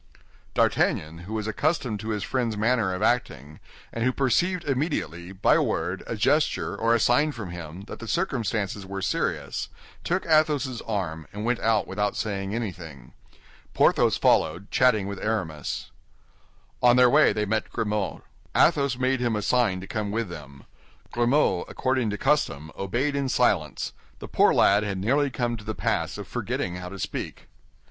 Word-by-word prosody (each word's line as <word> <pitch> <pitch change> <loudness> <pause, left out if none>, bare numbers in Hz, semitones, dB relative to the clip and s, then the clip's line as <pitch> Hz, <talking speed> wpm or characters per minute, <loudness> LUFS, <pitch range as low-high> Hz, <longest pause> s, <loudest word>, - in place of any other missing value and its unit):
D'Artagnan, 80 +3 +1
who - - -4
was 105 -1 -2
accustomed 120 -1 -1
to 110 +2 -6
his 105 -2 -2
friend's 120 -5 -1
manner 110 -2 +2
of 90 - -3
acting, 75 - -1 0.3
and 115 - -2
who 130 - +3
perceived 175 +8 +1
immediately, 130 - -2
by 95 0 +2
a - - +4
word, 90 +3 -1
a - - -3
gesture, 145 +8 +1
or 115 +1 +2
a - - +2
sign 145 +7 +3
from 105 -8 -7
him, 85 0 -8
that 100 - -9
the 115 - -8
circumstances 115 - -1
were 95 0 -5
serious, - - -2 0.3
took 180 +2 -1
Athos's 150 -6 +2
arm, 85 -8 -3
and 105 +2 -5
went 120 0 +1
out 110 -1 +2
without 105 +1 -1
saying 100 -1 -2
anything. 80 - -6 0.6
Porthos - - +4
followed, 85 +6 +2
chatting 125 -6 +3
with 100 0 -5
Aramis. 90 -10 -3 0.9
On 120 0 +6
their 125 0 +7
way 120 - +5
they 105 - -1
met 110 +1 -1
Grimaud. 105 -3 -2 0.3
Athos 140 -3 +3
made 130 0 +1
him 120 -3 0
a 105 - -2
sign 115 -7 +2
to - - -7
come 105 -1 -3
with 110 -1 -2
them. 70 -4 -10 0.5
Grimaud, 120 -6 +2
according 130 -3 0
to 105 - -3
custom, 80 - 0
obeyed 120 +9 -1
in 140 -1 -1
silence; 95 - +1 0.2
the - - -8
poor - - +4
lad 100 +1 +4
had 100 -2 -2
nearly 140 +9 +1
come 120 -2 -1
to 105 - -11
the 110 +1 -4
pass - - -1
of - - -7
forgetting 90 0 -3
how 90 0 -6
to 100 - -8
speak. - - -5
110 Hz, 170 wpm, -26 LUFS, 95-125 Hz, 0.9 s, their